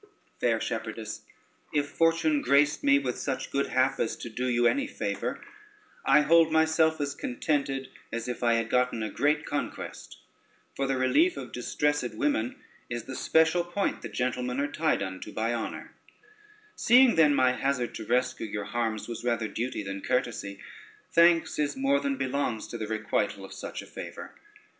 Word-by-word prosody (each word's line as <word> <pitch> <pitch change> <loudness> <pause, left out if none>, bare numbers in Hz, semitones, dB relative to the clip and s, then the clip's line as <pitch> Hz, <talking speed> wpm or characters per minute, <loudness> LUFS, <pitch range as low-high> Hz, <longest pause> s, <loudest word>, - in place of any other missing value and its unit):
] - - -38
"Fair - - +2
shepherdess, - - -5 0.5
if 145 -2 +1
Fortune 165 -2 +2
graced 145 +3 +3
me 140 0 +5
with 130 -3 -2
such 135 -2 -3
good 140 0 0
hap 130 +1 +1
as 115 - 0
to 120 - -8
do 125 +3 -2
you 120 -1 +2
any 280 - +2
favor, - - -3 0.6
I 140 +2 +5
hold 160 +2 +5
myself 160 0 +3
as 140 -1 -1
contented 135 0 -2 0.2
as 115 +1 -4
if 125 - -4
I 120 -1 +3
had 115 0 0
gotten 125 -3 +1
a 110 - -3
great 150 +1 +1
conquest; 145 - -5 0.6
for 135 - -1
the 135 -1 0
relief 310 - +3
of - - -7
distressed 125 -1 -1
women 120 -2 0 0.3
is 120 -1 -3
the 130 - -7
special 160 +4 +3
point 175 +3 -2
that 120 - -7
gentlemen 125 +2 -1
are 145 +1 -1
tied 155 -9 +1
unto 95 -1 -6
by 115 +2 -1
honor: 115 -2 -5 0.8
seeing 250 +1 +6
then 150 -3 +5
my 130 -1 +4
hazard 125 -1 -1
to 110 - -6
rescue 125 +1 0
your 105 -1 -4
harms 110 0 -2
was 120 -1 -6
rather 115 -2 0
duty 115 0 -3
than 95 0 -5
courtesy, 110 -6 -2 0.5
thanks 170 -1 +4
is 150 - 0
more 275 +1 +2
than 280 -1 -1
belongs 130 - -2
to 120 - -5
the 110 - -3
requital 105 -2 -1
of - - -11
such - - -6
a - - -12
favor. - - -8
130 Hz, 175 wpm, -28 LUFS, 120-150 Hz, 0.8 s, seeing